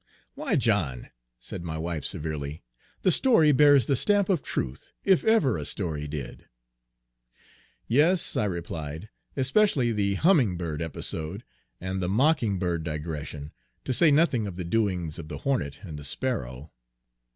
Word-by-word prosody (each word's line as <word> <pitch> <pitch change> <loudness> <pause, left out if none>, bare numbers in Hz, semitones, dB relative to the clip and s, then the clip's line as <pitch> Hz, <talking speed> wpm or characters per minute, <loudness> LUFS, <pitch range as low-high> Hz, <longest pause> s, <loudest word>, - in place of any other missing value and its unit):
"Why, - - -1
John!" 65 -2 0 0.3
said 75 - -7
my 80 -2 -4
wife 80 -2 -3
severely, 75 -1 -3 0.4
"the 185 - +4
story 175 - +5
bears 145 -1 +6
the 140 - +2
stamp 205 - +2
of 180 -7 +2
truth, 65 - -4
if 190 -3 +4
ever 220 - +3
a - - -4
story 80 -6 -3
did." 70 -4 -7 1.4
"Yes," 155 +9 +3
I 105 - +1
replied, 85 -1 -5 0.3
"especially 135 - +3
the 100 -2 0
humming 130 - +3
bird 80 -3 -4
episode, 80 - -4 0.4
and 95 +1 -3
the 90 - -1
mocking 115 -2 +2
bird 85 -3 -1
digression, 75 -2 -5 0.3
to 130 - 0
say 165 +5 +5
nothing 140 -7 +3
of 95 - -6
the 90 -1 -5
doings 90 -5 -1
of 80 - -8
the 75 -2 -6
hornet 115 - -2
and 80 -6 -7
the - - -9
sparrow." 70 - -3
95 Hz, 150 wpm, -27 LUFS, -, 1.4 s, bears